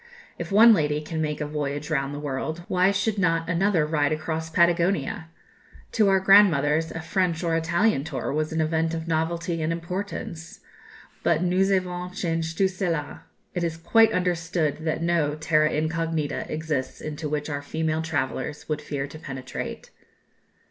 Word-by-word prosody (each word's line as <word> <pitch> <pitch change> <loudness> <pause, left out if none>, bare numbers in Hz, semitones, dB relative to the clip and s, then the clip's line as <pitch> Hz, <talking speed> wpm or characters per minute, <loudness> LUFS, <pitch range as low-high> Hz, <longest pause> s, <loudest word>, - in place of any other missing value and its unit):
If - - -5
one 225 +3 +8
lady 150 -5 +1
can 160 +1 -4
make 150 -1 -2
a - - -1
voyage 145 0 -3
round 135 -2 0
the 145 - -5
world, 150 +4 -4
why 185 +1 +3
should 200 +1 0
not 165 -3 +1
another 170 -1 +2
ride 150 -2 +1
across 160 +1 -3
Patagonia? 170 -2 +1 0.6
To 215 -3 +3
our 195 0 +4
grandmothers 165 -6 +5
a 165 - -5
French 175 0 0
or 165 -1 +1
Italian 170 0 +2
tour 145 -3 -3
was 155 +1 -1
an 160 0 0
event 160 +1 0
of 160 0 -5
novelty 165 +1 -1
and 155 +1 0
importance; 170 -1 -5 0.6
but 170 0 +2
nous 185 +2 +2
avons 180 -2 -1
changé 165 -2 -2
tout 195 - +4
cela. 170 -6 -3 0.3
It 175 - -2
is 165 -1 -2
quite 225 +7 +4
understood 170 -4 0
that 160 +1 -1
no 165 -4 +1
"terra 155 0 +2
incognita" 160 -1 -2
exists 155 -4 -3
into 155 0 -5
which 150 0 -2
our 145 -2 -3
female 160 +2 -1
travellers 150 -2 -3
would 155 -1 -2
fear 140 -2 -3
to 150 +2 -10
penetrate. 130 -4 -6
160 Hz, 160 wpm, -25 LUFS, 150-175 Hz, 0.6 s, one